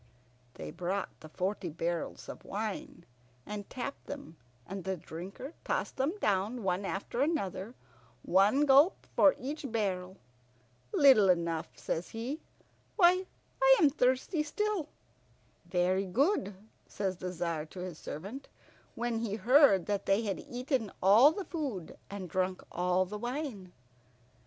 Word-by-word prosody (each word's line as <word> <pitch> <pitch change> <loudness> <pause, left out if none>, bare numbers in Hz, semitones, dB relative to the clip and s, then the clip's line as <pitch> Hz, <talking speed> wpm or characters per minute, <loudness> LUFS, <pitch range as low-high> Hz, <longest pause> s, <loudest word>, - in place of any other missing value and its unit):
They 75 -1 -7
brought 185 +2 -2
the 155 - -12
forty 185 +2 -2
barrels 165 +2 -3
of - - -8
wine, 225 - -5 0.4
and 210 -1 -6
tapped 260 +2 -6
them, 280 - -7 0.3
and 195 -1 -6
the 190 -1 -2
Drinker 185 - -8
tossed - - -2
them 285 +9 0
down 210 - 0
one 190 +1 0
after 200 +6 -3
another, 235 - -1 0.5
one 205 +10 +4
gulp 285 +6 +5
for 290 - +6
each 275 0 -5
barrel. 190 -4 -2 0.7
"Little 255 -9 +6
enough," 170 -2 0
says 165 - -3
he, 245 +7 -4 0.6
"Why, 365 -1 +5 0.3
I - - +8
am 300 -6 +5
thirsty 260 +4 +1
still." 390 +1 -1 0.8
"Very 185 +2 +1
good," 225 - +1 0.3
says 190 -3 -3
the 180 0 -4
Tzar 165 -3 -3
to 180 +3 -9
his 180 -3 -6
servant, 200 - -7 0.5
when 235 -1 -1
he 220 -3 -2
heard 225 - +5
that 205 -1 -2
they 195 +4 +3
had 200 -3 -2
eaten 250 -3 -2
all 220 +10 +8
the 380 +3 -5
food 270 - -4
and 200 -2 -6
drunk 185 +2 -1
all 180 +1 +1
the 210 +3 -6
wine. 240 - -4
210 Hz, 135 wpm, -31 LUFS, 185-275 Hz, 0.8 s, I